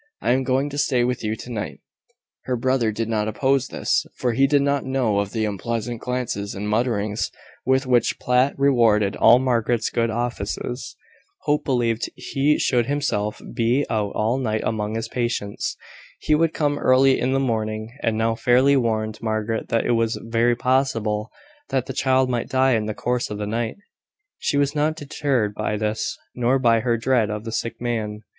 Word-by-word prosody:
I -, -, +1 dB
am 130 Hz, +2 st, +3 dB
going 130 Hz, +2 st, +1 dB
to 145 Hz, -, -3 dB
stay 130 Hz, -4 st, +2 dB
with 125 Hz, -1 st, -1 dB
you 110 Hz, 0 st, -1 dB
to 120 Hz, +3 st, -9 dB
night." 105 Hz, -3 st, -4 dB, 0.7 s
Her 130 Hz, -, 0 dB
brother 125 Hz, -2 st, +1 dB
did 110 Hz, +1 st, -3 dB
not 110 Hz, -2 st, 0 dB
oppose 135 Hz, +4 st, +1 dB
this, -, -, 0 dB
for 120 Hz, -2 st, 0 dB
he 135 Hz, +4 st, +4 dB
did 140 Hz, 0 st, +3 dB
not 140 Hz, 0 st, +1 dB
know 130 Hz, -6 st, 0 dB
of 100 Hz, -1 st, -2 dB
the 110 Hz, -2 st, -1 dB
unpleasant 115 Hz, +3 st, -3 dB
glances 125 Hz, -5 st, -3 dB
and 100 Hz, +2 st, -4 dB
mutterings, 105 Hz, -1 st, 0 dB, 0.4 s
with 130 Hz, +1 st, +3 dB
which 125 Hz, -2 st, +2 dB
Platt 125 Hz, +2 st, +2 dB
rewarded 115 Hz, -7 st, +3 dB
all 120 Hz, -, +6 dB
Margaret's 120 Hz, -3 st, 0 dB
good 115 Hz, -1 st, +1 dB
offices. 120 Hz, +1 st, -3 dB, 0.5 s
Hope 150 Hz, 0 st, +1 dB
believed 120 Hz, -4 st, 0 dB
he 145 Hz, +2 st, +1 dB
should 120 Hz, -3 st, +1 dB
himself 135 Hz, -8 st, -1 dB
be 120 Hz, +5 st, +1 dB
out 105 Hz, -2 st, -1 dB
all 115 Hz, +5 st, +1 dB
night 110 Hz, -4 st, -1 dB
among 110 Hz, 0 st, -2 dB
his 115 Hz, 0 st, -3 dB
patients. 115 Hz, -4 st, -2 dB, 0.4 s
He -, -, +1 dB
would 160 Hz, +1 st, +3 dB
come 145 Hz, -1 st, 0 dB
early 130 Hz, +1 st, +4 dB
in 130 Hz, +2 st, 0 dB
the 135 Hz, -, +2 dB
morning, 110 Hz, -2 st, -2 dB
and 110 Hz, -1 st, 0 dB
now 115 Hz, 0 st, +1 dB
fairly 125 Hz, +4 st, +4 dB
warned 110 Hz, -4 st, -1 dB
Margaret 110 Hz, 0 st, -2 dB
that 115 Hz, -, +1 dB
it -, -, +1 dB
was 115 Hz, -1 st, +1 dB
very 115 Hz, +1 st, +2 dB
possible 115 Hz, -4 st, 0 dB, 0.4 s
that 130 Hz, -2 st, 0 dB
the 135 Hz, -, -5 dB
child 130 Hz, 0 st, +2 dB
might 120 Hz, -2 st, -2 dB
die 130 Hz, 0 st, +3 dB
in 110 Hz, -2 st, 0 dB
the 110 Hz, -, -3 dB
course 125 Hz, 0 st, -1 dB
of 105 Hz, -, -4 dB
the 105 Hz, -, -3 dB
night. 115 Hz, +2 st, -2 dB, 0.6 s
She 140 Hz, -, 0 dB
was 140 Hz, -1 st, +2 dB
not 155 Hz, +1 st, +1 dB
deterred 140 Hz, -8 st, -1 dB
by 105 Hz, 0 st, -2 dB
this, 110 Hz, +1 st, -2 dB, 0.2 s
nor 125 Hz, +2 st, +2 dB
by 115 Hz, -3 st, +3 dB
her 120 Hz, 0 st, +1 dB
dread 115 Hz, -2 st, +1 dB
of 105 Hz, 0 st, -4 dB
the 115 Hz, -, -5 dB
sick 115 Hz, +1 st, -3 dB
man. 110 Hz, -3 st, -3 dB
120 Hz, 185 wpm, -23 LUFS, 110-130 Hz, 0.7 s, all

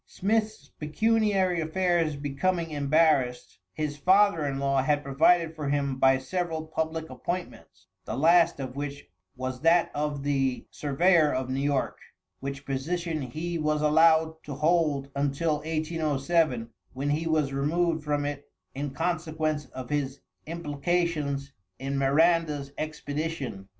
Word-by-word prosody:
Smith's 215 Hz, -5 st, -1 dB
pecuniary 195 Hz, +1 st, +1 dB
affairs 165 Hz, -1 st, +1 dB
becoming 165 Hz, +4 st, -1 dB
embarrassed, 140 Hz, -4 st, +1 dB
his 150 Hz, -1 st, -3 dB
father 190 Hz, 0 st, +4 dB
in 135 Hz, -1 st, -2 dB
law 135 Hz, -1 st, +1 dB
had 145 Hz, +2 st, +1 dB
provided 160 Hz, +4 st, +3 dB
for 150 Hz, -3 st, -3 dB
him 140 Hz, -1 st, 0 dB
by 135 Hz, 0 st, +5 dB
several 160 Hz, +3 st, -3 dB
public 160 Hz, 0 st, -3 dB
appointments, 125 Hz, -, -6 dB, 0.2 s
the 110 Hz, -, -4 dB
last 170 Hz, +2 st, +4 dB
of 130 Hz, -1 st, -5 dB
which 140 Hz, 0 st, -5 dB, 0.3 s
was 130 Hz, 0 st, -5 dB
that 165 Hz, +2 st, +4 dB
of 145 Hz, -1 st, -2 dB
the 135 Hz, -3 st, 0 dB
surveyor 155 Hz, +2 st, +3 dB
of 130 Hz, 0 st, -2 dB
New 135 Hz, +1 st, -1 dB
York, 140 Hz, -1 st, -1 dB, 0.4 s
which 140 Hz, +1 st, -6 dB
position 160 Hz, +4 st, -2 dB
he 160 Hz, +7 st, -4 dB
was 150 Hz, 0 st, 0 dB
allowed 160 Hz, +1 st, +4 dB
to 145 Hz, -, -6 dB
hold 150 Hz, -2 st, +1 dB
until 145 Hz, +3 st, 0 dB
1807, 155 Hz, -4 st, 0 dB, 0.2 s
when 140 Hz, +3 st, -2 dB
he 160 Hz, +3 st, -1 dB
was 155 Hz, -4 st, +1 dB
removed 160 Hz, +3 st, 0 dB
from 145 Hz, -1 st, -1 dB
it 145 Hz, 0 st, -5 dB, 0.2 s
in 140 Hz, +2 st, -3 dB
consequence 155 Hz, -1 st, -2 dB
of 130 Hz, +2 st, -8 dB
his 140 Hz, -2 st, -2 dB, 0.3 s
implication 165 Hz, -1 st, -1 dB, 0.4 s
in 135 Hz, +3 st, -3 dB
Miranda's 145 Hz, +1 st, +2 dB
expedition. 150 Hz, -8 st, -4 dB
150 Hz, 130 wpm, -27 LUFS, 140-165 Hz, 0.4 s, by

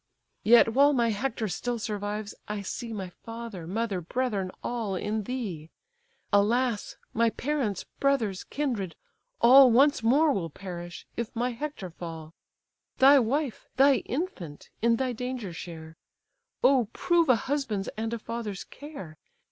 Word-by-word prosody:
"Yet 225 Hz, 0 st, +6 dB
while 285 Hz, +3 st, +5 dB
my 235 Hz, -3 st, +2 dB
Hector 225 Hz, 0 st, -2 dB
still 240 Hz, +6 st, -2 dB
survives, 210 Hz, -1 st, -4 dB
I 210 Hz, -1 st, -4 dB
see 230 Hz, +4 st, -5 dB
My 195 Hz, -4 st, -5 dB
father, 225 Hz, -7 st, -7 dB
mother, 200 Hz, -1 st, -2 dB
brethren, 205 Hz, 0 st, -1 dB
all, 225 Hz, -5 st, -2 dB
in 210 Hz, +2 st, -2 dB
thee: 195 Hz, -12 st, -4 dB, 0.6 s
Alas! 225 Hz, +2 st, +2 dB, 0.2 s
my 230 Hz, 0 st, +3 dB
parents, 245 Hz, -6 st, -2 dB, 0.2 s
brothers, 235 Hz, -9 st, +1 dB
kindred, 230 Hz, -, -3 dB, 0.5 s
all 260 Hz, +2 st, +9 dB
Once 275 Hz, +4 st, +5 dB
more 285 Hz, +7 st, +4 dB
will 170 Hz, -7 st, -2 dB
perish, 175 Hz, 0 st, -8 dB
if 235 Hz, -1 st, -2 dB
my 245 Hz, +2 st, 0 dB
Hector 240 Hz, -, -5 dB
fall, 165 Hz, -2 st, -8 dB, 0.6 s
Thy 275 Hz, +2 st, +8 dB
wife, 265 Hz, +2 st, -1 dB
thy 275 Hz, +1 st, +6 dB
infant, 240 Hz, -, -5 dB
in 230 Hz, +1 st, +4 dB
thy 255 Hz, +1 st, -1 dB
danger 250 Hz, -5 st, -4 dB
share: 160 Hz, -1 st, -9 dB, 0.7 s
Oh, 255 Hz, -5 st, +4 dB
prove 340 Hz, -4 st, +2 dB
a 255 Hz, -, +7 dB
husband's 235 Hz, -6 st, -2 dB
and 225 Hz, +1 st, -4 dB
a 235 Hz, -, -2 dB
father's 220 Hz, -3 st, -5 dB
care! 235 Hz, -, -10 dB
230 Hz, 140 wpm, -28 LUFS, 195-260 Hz, 0.7 s, all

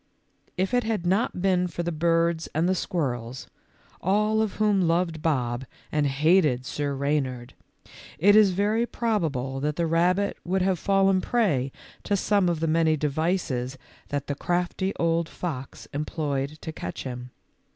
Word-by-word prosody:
If 190 Hz, +4 st, 0 dB
it 245 Hz, 0 st, +3 dB
had 220 Hz, -5 st, -2 dB
not 185 Hz, 0 st, 0 dB
been 180 Hz, -2 st, +2 dB
for 175 Hz, 0 st, -4 dB
the 170 Hz, -, -2 dB
birds 165 Hz, 0 st, +1 dB
and 160 Hz, +3 st, +2 dB
the 185 Hz, -, +3 dB
squirrels, 130 Hz, -9 st, -3 dB, 0.6 s
all 210 Hz, +4 st, +2 dB
of 220 Hz, -3 st, -1 dB
whom 210 Hz, -2 st, +2 dB
loved 165 Hz, -1 st, 0 dB
Bob 125 Hz, -6 st, 0 dB, 0.3 s
and 150 Hz, -1 st, +2 dB
hated 145 Hz, -2 st, +3 dB
Sir 145 Hz, +1 st, -2 dB
Reynard, 135 Hz, -3 st, -1 dB, 0.6 s
it 200 Hz, +7 st, +5 dB
is 215 Hz, -2 st, +7 dB
very 210 Hz, +5 st, +1 dB
probable 155 Hz, -, -1 dB
that 150 Hz, +2 st, -1 dB
the 170 Hz, -, 0 dB
rabbit 180 Hz, +5 st, +2 dB
would 185 Hz, +1 st, 0 dB
have 185 Hz, -2 st, +1 dB
fallen 195 Hz, -1 st, +3 dB
prey 165 Hz, -, +1 dB, 0.3 s
to 200 Hz, -, +1 dB
some 200 Hz, 0 st, +2 dB
one 175 Hz, -, +2 dB
of 160 Hz, -, -6 dB
the 165 Hz, -, +1 dB
many 160 Hz, 0 st, +3 dB
devices 145 Hz, -4 st, -1 dB, 0.3 s
that 145 Hz, -1 st, -3 dB
the 145 Hz, -, -2 dB
crafty 180 Hz, +5 st, -1 dB
old 165 Hz, 0 st, 0 dB
fox 140 Hz, -7 st, -6 dB
employed 145 Hz, -1 st, -2 dB
to 160 Hz, -, -5 dB
catch 90 Hz, -, -6 dB
him. 125 Hz, -1 st, -6 dB
165 Hz, 160 wpm, -26 LUFS, 140-190 Hz, 0.6 s, is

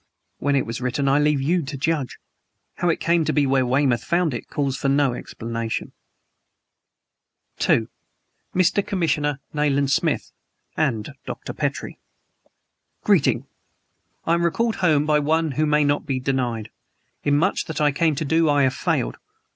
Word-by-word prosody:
When 145 Hz, 0 st, +1 dB
it 135 Hz, -, +1 dB
was 115 Hz, +2 st, -5 dB
written 125 Hz, +3 st, -1 dB
I 135 Hz, +2 st, +4 dB
leave 150 Hz, -2 st, +2 dB
you 170 Hz, +5 st, +2 dB
to 140 Hz, -1 st, -6 dB
judge. 145 Hz, -2 st, -1 dB, 0.6 s
How 175 Hz, -, +1 dB
it 165 Hz, -, +1 dB
came 170 Hz, -1 st, +2 dB
to -, -, 0 dB
be 145 Hz, -2 st, +2 dB
where 135 Hz, -1 st, +2 dB
Weymouth 130 Hz, -1 st, +2 dB
found 170 Hz, -4 st, +1 dB
it 120 Hz, -, -6 dB
calls 140 Hz, -2 st, -1 dB
for 135 Hz, -, -1 dB
no 140 Hz, -2 st, +3 dB
explanation: 115 Hz, -1 st, -4 dB, 1.7 s
"To -, -, +2 dB, 0.7 s
Mr. 185 Hz, +2 st, +3 dB
Commissioner 150 Hz, -8 st, -1 dB
NAYLAND 140 Hz, -2 st, +1 dB
SMITH -, -, 0 dB, 0.4 s
and 115 Hz, -9 st, -1 dB
Dr. -, -, -6 dB
PETRIE -, -, -3 dB, 1.0 s
"Greeting! -, -, +3 dB, 0.8 s
I 165 Hz, -, +2 dB
am 170 Hz, 0 st, +1 dB
recalled 220 Hz, +7 st, 0 dB
home 155 Hz, -5 st, +3 dB
by 150 Hz, -1 st, +3 dB
One 160 Hz, +1 st, +1 dB
who 155 Hz, +3 st, 0 dB
may 150 Hz, 0 st, +3 dB
not 145 Hz, 0 st, 0 dB
be 135 Hz, -2 st, -1 dB
denied. 125 Hz, -5 st, -2 dB, 0.5 s
In 145 Hz, 0 st, +3 dB
much 185 Hz, +6 st, +1 dB
that 160 Hz, -2 st, -5 dB
I 150 Hz, -1 st, +3 dB
came 155 Hz, +2 st, +1 dB
to 155 Hz, +2 st, -2 dB
do 160 Hz, +2 st, +2 dB
I 145 Hz, -1 st, +3 dB
have 130 Hz, 0 st, +2 dB
failed. -, -, -1 dB
145 Hz, 160 wpm, -23 LUFS, 135-160 Hz, 1.7 s, I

